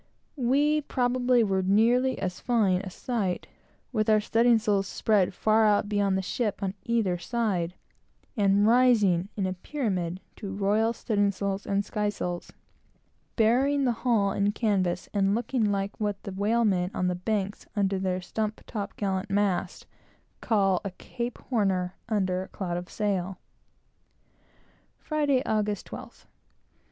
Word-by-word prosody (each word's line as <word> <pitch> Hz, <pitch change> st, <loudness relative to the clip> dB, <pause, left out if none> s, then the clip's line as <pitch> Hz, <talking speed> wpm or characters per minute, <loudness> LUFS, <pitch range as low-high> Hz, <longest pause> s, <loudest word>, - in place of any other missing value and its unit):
We 290 Hz, +3 st, +2 dB
probably 250 Hz, -2 st, +2 dB
were 190 Hz, -3 st, +1 dB, 0.5 s
as 180 Hz, -1 st, -3 dB
fine 205 Hz, -7 st, +2 dB
a 195 Hz, -, -6 dB
sight, 195 Hz, -2 st, -2 dB, 0.5 s
with 215 Hz, -3 st, 0 dB
our 215 Hz, 0 st, +5 dB
studding 230 Hz, +2 st, +3 dB
sails 205 Hz, -3 st, 0 dB
spread 205 Hz, -4 st, +2 dB
far 220 Hz, +3 st, +3 dB
out 205 Hz, 0 st, +2 dB
beyond 200 Hz, -2 st, +1 dB
the 190 Hz, -, -2 dB
ship 210 Hz, +1 st, -2 dB
on 190 Hz, -1 st, -1 dB
either 220 Hz, -7 st, 0 dB
side, 185 Hz, -4 st, -1 dB, 0.6 s
and 200 Hz, -2 st, +3 dB
rising 215 Hz, -7 st, +4 dB
in 195 Hz, -, 0 dB
a 185 Hz, -, -1 dB
pyramid 185 Hz, -, -3 dB, 0.2 s
to 195 Hz, -2 st, -6 dB
royal 210 Hz, +3 st, +2 dB
studding 205 Hz, -3 st, +1 dB
sails 200 Hz, 0 st, -3 dB
and 200 Hz, 0 st, 0 dB
sky 210 Hz, -1 st, -1 dB
sails, 175 Hz, -4 st, -4 dB, 0.8 s
burying 265 Hz, +5 st, +3 dB
the 250 Hz, -, +3 dB
hull 225 Hz, -4 st, +1 dB
in 200 Hz, +1 st, +1 dB
canvas, 185 Hz, -6 st, 0 dB
and 200 Hz, 0 st, +2 dB
looking 240 Hz, 0 st, 0 dB
like 195 Hz, 0 st, -2 dB
what 205 Hz, -2 st, -2 dB
the 200 Hz, -, -6 dB
whale 215 Hz, +5 st, +1 dB
men 180 Hz, -3 st, +1 dB
on 185 Hz, -, 0 dB
the 180 Hz, -, +1 dB
Banks, 200 Hz, +2 st, -3 dB
under 195 Hz, -2 st, +1 dB
their 185 Hz, -1 st, -1 dB
stump 215 Hz, +4 st, -3 dB
top 205 Hz, -3 st, -5 dB
gallant 195 Hz, 0 st, -2 dB
masts, 200 Hz, -2 st, 0 dB, 0.6 s
call 195 Hz, -5 st, +2 dB
"a 200 Hz, -, -3 dB
Cape 240 Hz, 0 st, -5 dB
Horn 215 Hz, -6 st, 0 dB
er 180 Hz, -1 st, -2 dB, 0.2 s
under 185 Hz, -4 st, 0 dB
a 190 Hz, -, -7 dB
cloud 175 Hz, -4 st, -4 dB
of 175 Hz, +1 st, -6 dB
sail." 195 Hz, -3 st, -2 dB, 1.6 s
Friday, 290 Hz, -4 st, 0 dB
August 210 Hz, -1 st, -1 dB
12th. -, -, -10 dB
205 Hz, 145 wpm, -27 LUFS, 190-225 Hz, 1.6 s, our